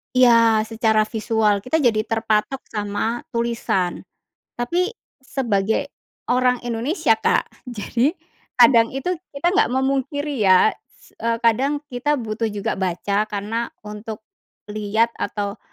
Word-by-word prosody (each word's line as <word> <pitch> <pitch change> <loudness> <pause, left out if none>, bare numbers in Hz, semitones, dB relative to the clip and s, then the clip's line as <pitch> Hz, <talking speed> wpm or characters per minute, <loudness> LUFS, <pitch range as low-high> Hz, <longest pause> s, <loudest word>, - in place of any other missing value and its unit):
Iya, 230 -3 +5
secara 220 -1 +2
visual 215 -2 +1
kita 285 +7 0
jadi 235 -7 +2
terpatok 225 +3 0
sama 210 +2 -2
tulisan. 230 -6 -1 0.5
Tapi, 340 +10 0 0.3
sebagai 220 -6 -1 0.4
orang 250 0 +2
Indonesia, 240 - 0
Kak, 225 - -1
jadi 245 +4 -1 0.4
kadang 235 0 +5
itu 270 +7 -2 0.2
kita 280 +5 +1
nggak 405 +4 +2
memungkiri 275 +2 -1
ya 185 -1 +6
s - - -25 0.3
kadang 270 +6 +2
kita 260 +4 0
butuh 225 -4 -2
juga 210 -1 -3
baca 200 +3 0
karena 215 +3 -3 0.2
untuk 210 +1 -8 0.5
lihat 215 +2 +1
atau, 200 -1 -3
230 Hz, 115 wpm, -21 LUFS, 215-255 Hz, 0.5 s, ya